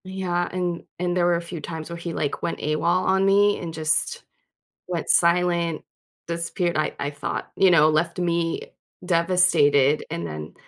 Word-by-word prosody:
Yeah, 180 Hz, -2 st, -2 dB
and 175 Hz, -2 st, -3 dB, 0.2 s
and 175 Hz, 0 st, -1 dB
there 175 Hz, -1 st, +2 dB
were 175 Hz, 0 st, +3 dB
a 170 Hz, -, -2 dB
few 170 Hz, -1 st, -7 dB
times 160 Hz, +1 st, -6 dB
where 170 Hz, -, -6 dB
he, 170 Hz, 0 st, -5 dB
like, 145 Hz, -, -2 dB
went -, -, -2 dB
AWOL 155 Hz, +1 st, -1 dB, 0.2 s
on 190 Hz, 0 st, +2 dB
me 205 Hz, +1 st, +4 dB
and 170 Hz, -2 st, -5 dB
just 155 Hz, 0 st, 0 dB, 0.6 s
went 175 Hz, -3 st, -4 dB
silent, 170 Hz, -1 st, +2 dB, 0.5 s
disappeared 170 Hz, +1 st, -2 dB
I 155 Hz, -, 0 dB
I 145 Hz, -, -2 dB
thought, 145 Hz, -, -5 dB
you 190 Hz, -, +5 dB
know, 155 Hz, -2 st, +6 dB
left 165 Hz, +3 st, 0 dB
me 170 Hz, -1 st, -1 dB, 0.4 s
devastated 165 Hz, -5 st, +3 dB
and 85 Hz, -, -4 dB
then 75 Hz, -1 st, -7 dB
170 Hz, 170 wpm, -23 LUFS, 155-180 Hz, 0.6 s, know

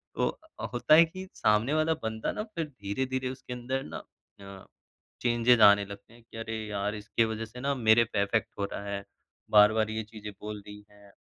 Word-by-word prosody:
तो -, -, -1 dB, 0.3 s
होता 120 Hz, +5 st, +3 dB
है 165 Hz, +1 st, +8 dB
कि 185 Hz, +3 st, -9 dB
सामने 110 Hz, +7 st, +2 dB
वाला 155 Hz, +1 st, +2 dB
बंदा 110 Hz, 0 st, -2 dB
ना 210 Hz, -, -4 dB
फिर 165 Hz, -, -1 dB
धीरे-धीरे 130 Hz, +2 st, -3 dB
उसके 130 Hz, -1 st, -7 dB
अंदर 130 Hz, +2 st, -3 dB
ना -, -, -7 dB, 0.4 s
अ, 100 Hz, -1 st, -11 dB, 0.6 s
चेंजेज़ 120 Hz, -1 st, +3 dB
आने 100 Hz, -1 st, +7 dB
लगते 100 Hz, +2 st, -12 dB
हैं 120 Hz, -, -17 dB
कि 115 Hz, -, -13 dB
अरे, 115 Hz, 0 st, -4 dB
यार! 105 Hz, 0 st, -2 dB
इसकी 105 Hz, +2 st, 0 dB
वजह 110 Hz, 0 st, -3 dB
से 115 Hz, +3 st, -12 dB
ना 140 Hz, +1 st, 0 dB
मेरे 115 Hz, -2 st, +5 dB
पे 110 Hz, -3 st, -1 dB
इफ़ेक्ट 110 Hz, +2 st, 0 dB
हो 100 Hz, -, +1 dB
रहा 100 Hz, -, -5 dB
है। 100 Hz, 0 st, -4 dB, 0.5 s
बार-बार 110 Hz, +1 st, +5 dB
ये 110 Hz, 0 st, -3 dB
चीज़ें 105 Hz, -1 st, -9 dB
बोल 105 Hz, 0 st, -6 dB
रही 105 Hz, 0 st, -10 dB
हैं। 100 Hz, -1 st, -19 dB
110 Hz, 195 wpm, -29 LUFS, 105-125 Hz, 0.6 s, है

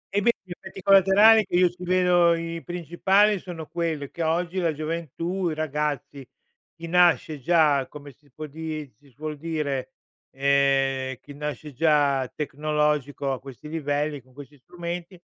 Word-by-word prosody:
Eh, 205 Hz, -, +3 dB
beh, 235 Hz, +4 st, +4 dB
gli 185 Hz, -, -16 dB
effetti 190 Hz, +1 st, -9 dB
collaterali, 200 Hz, +3 st, +6 dB
che 180 Hz, -, -4 dB
io 180 Hz, 0 st, +5 dB
ci 180 Hz, +1 st, -12 dB
vedo, 180 Hz, -1 st, +4 dB
i 165 Hz, 0 st, -5 dB
pincipali, 190 Hz, +4 st, +2 dB
sono 165 Hz, -4 st, -8 dB
quelli 160 Hz, -5 st, -3 dB
che 170 Hz, -, -7 dB
oggi 170 Hz, +3 st, 0 dB
la 170 Hz, -2 st, +1 dB
gioventù, 165 Hz, +4 st, -3 dB
i 155 Hz, -, -3 dB
ragazzi, 150 Hz, -2 st, -3 dB, 0.5 s
chi 165 Hz, 0 st, -9 dB
nasce 170 Hz, -3 st, +3 dB
già, 150 Hz, -3 st, +3 dB
come 145 Hz, -1 st, -11 dB
si 145 Hz, +1 st, -29 dB
può 155 Hz, +4 st, -8 dB
di 155 Hz, -1 st, -6 dB
si 140 Hz, -, -23 dB
suol 150 Hz, +4 st, -6 dB
dire, 145 Hz, -4 st, -3 dB, 0.4 s
ehm, 135 Hz, -1 st, +1 dB
chi 145 Hz, -, -12 dB
nasce 150 Hz, 0 st, -6 dB
già 145 Hz, -2 st, +2 dB
tecnologico 150 Hz, -2 st, -1 dB
a 130 Hz, -, -3 dB
questi 135 Hz, +3 st, -11 dB
livelli, 145 Hz, -2 st, -2 dB
con 130 Hz, +1 st, -25 dB
questi 145 Hz, +2 st, -12 dB
strumenti, 175 Hz, +4 st, -7 dB
155 Hz, 155 wpm, -25 LUFS, 145-175 Hz, 0.5 s, collaterali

